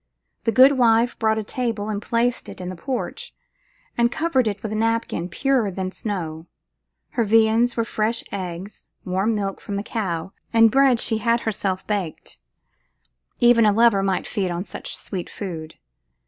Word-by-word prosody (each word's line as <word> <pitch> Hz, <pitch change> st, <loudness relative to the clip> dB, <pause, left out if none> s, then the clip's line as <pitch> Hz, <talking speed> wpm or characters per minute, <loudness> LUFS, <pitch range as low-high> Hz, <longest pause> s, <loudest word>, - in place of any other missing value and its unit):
The 225 Hz, -, +3 dB
good 260 Hz, +3 st, +6 dB
wife 235 Hz, 0 st, +3 dB
brought 220 Hz, -1 st, +2 dB
a 220 Hz, -, -1 dB
table 225 Hz, -2 st, -3 dB
and 210 Hz, -1 st, -3 dB
placed 235 Hz, +3 st, 0 dB
it -, -, -9 dB
in 180 Hz, -1 st, -5 dB
the 185 Hz, -, -6 dB
porch, 275 Hz, -, -5 dB, 0.6 s
and 235 Hz, 0 st, +2 dB
covered 280 Hz, -7 st, +1 dB
it 200 Hz, -2 st, -3 dB
with 215 Hz, -, -3 dB
a -, -, -2 dB
napkin 225 Hz, -5 st, -1 dB
purer 260 Hz, +1 st, +1 dB
than 185 Hz, 0 st, -4 dB
snow. 170 Hz, -6 st, -5 dB, 0.6 s
Her 235 Hz, -, 0 dB
viands 225 Hz, +2 st, +3 dB
were 230 Hz, -, +2 dB
fresh 225 Hz, 0 st, -1 dB
eggs, 185 Hz, +1 st, -6 dB, 0.2 s
milk 180 Hz, -, -4 dB
warm 200 Hz, 0 st, 0 dB
from 200 Hz, -, -6 dB
the 200 Hz, -, -2 dB
cow, 190 Hz, -6 st, -3 dB, 0.2 s
and 225 Hz, -1 st, +6 dB
bread 270 Hz, -2 st, +4 dB
she 225 Hz, -2 st, 0 dB
had 235 Hz, +1 st, +1 dB
herself 195 Hz, -3 st, -2 dB
baked. 195 Hz, -7 st, -4 dB, 1.0 s
Even 240 Hz, -1 st, +6 dB
a 210 Hz, -, +5 dB
lover 225 Hz, -2 st, +4 dB
might 195 Hz, -1 st, 0 dB
feed 195 Hz, -4 st, -2 dB
on 175 Hz, +2 st, -3 dB
such -, -, -7 dB
sweet 180 Hz, -3 st, -5 dB
food. 160 Hz, -6 st, -7 dB
220 Hz, 170 wpm, -23 LUFS, 190-235 Hz, 1.0 s, good